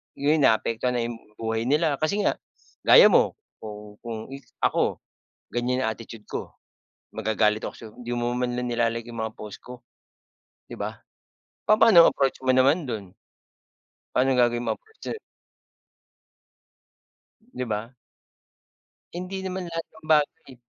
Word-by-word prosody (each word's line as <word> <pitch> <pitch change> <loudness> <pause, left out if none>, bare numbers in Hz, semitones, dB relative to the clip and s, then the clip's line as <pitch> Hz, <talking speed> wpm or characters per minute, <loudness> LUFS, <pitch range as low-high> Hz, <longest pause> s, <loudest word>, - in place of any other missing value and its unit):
yun 150 +3 +2
naapektuhan 115 +1 +2
na 120 - +1
yung 120 -1 -5 0.2
buhay 110 0 -1
nila. 150 0 +2
Kasi 200 +7 +1
nga - - +1 0.5
gaya - - +9
mo, - - +4 0.3
kung 105 -1 -9
kung 115 -1 -6 0.3
ako, - - +1 0.5
ganyan 125 +2 0
ang 110 - 0
attitude 115 -2 -11
ko, - - -5 0.6
magagalit 110 0 +1
ako - - -5
sa'yo, 110 -2 -11
"Hindi 120 0 -6
mo 120 0 -1
man 125 -1 -1
lang 125 - -2
nila-like 115 0 0
'yong 115 -1 -5
mga 110 0 -5
post 105 -2 -8
ko," 125 -1 -11 0.9
'di - - -6
ba? - - -4 0.7
Papaano 215 -4 +8
ang - - +5
approach 135 -1 +1
mo 130 - +4
naman 140 +6 +4
dun? 100 -6 -5 1.0
Pa'nong 130 0 +3
gagawin 120 0 +2
mong - - 0
approach 440 0 -28
do'n. 440 - -7 2.3
'Di 125 - -3
ba? 110 +3 -4 1.2
Hindi 185 +2 -5
naman 185 -1 -4
lahat 165 -1 -4
ng 160 - -18
bagay 150 -3 +1
125 Hz, 140 wpm, -25 LUFS, 115-155 Hz, 2.3 s, gaya